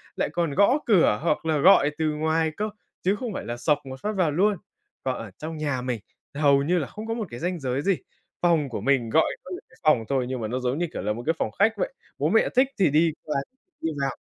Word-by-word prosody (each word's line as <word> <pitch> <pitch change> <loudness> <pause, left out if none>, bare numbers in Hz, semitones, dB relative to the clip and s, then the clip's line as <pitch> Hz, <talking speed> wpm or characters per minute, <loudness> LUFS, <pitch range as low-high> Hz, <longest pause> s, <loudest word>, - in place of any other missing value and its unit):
lại - - 0
còn 170 -4 0
gõ 205 +8 +5
cửa 175 - +4
hoặc 165 -1 0
là 160 -1 +2
gọi 150 -3 +6
từ 160 - 0
ngoài 160 +1 +1
cơ, 215 +1 -1 0.3
chứ 190 +3 +2
không 235 -1 -5
phải - - -5
là 120 0 -4
xộc 150 +4 +2
một 130 0 -8
phát 210 - -1
vào 180 -5 +2
luôn. 195 +6 +2 0.5
Còn 130 -1 -1
ở 115 -3 -7
trong 160 +1 -5
nhà 145 -4 -1
mình 125 -2 -2 0.4
hầu 140 -2 +4
như 175 +5 +2
là 145 - -3
không 215 +1 -8
có 225 - -1
một 225 -3 -3
cái 120 - -7
ranh 175 +1 -2
giới 130 -1 -1
gì, 195 +2 +2 0.4
phòng 165 -5 +3
của 115 - -4
mình 130 -4 +2
gọi 160 +8 +3
có 185 - -10
những 180 - -6 0.2
phòng 140 -8 +4
thôi 135 -2 +1
nhưng 130 -2 -3
mà 110 - -2
nó 125 +4 -2
giống 125 +2 -1
như, 175 - 0
kiểu - - -4
là, 105 +2 -1
một 120 +2 -7
cái 160 - +2
phòng - - -1
khách 220 +3 +5
vậy, - - -2 0.2
bố - - +1
mẹ - - +3
thích 260 +2 +5
thì 185 -5 +5
đi 160 +3 +4
qua 150 - -2 0.4
đi 160 - 0
vào, 135 - +1
155 Hz, 260 wpm, -25 LUFS, 135-185 Hz, 0.5 s, gọi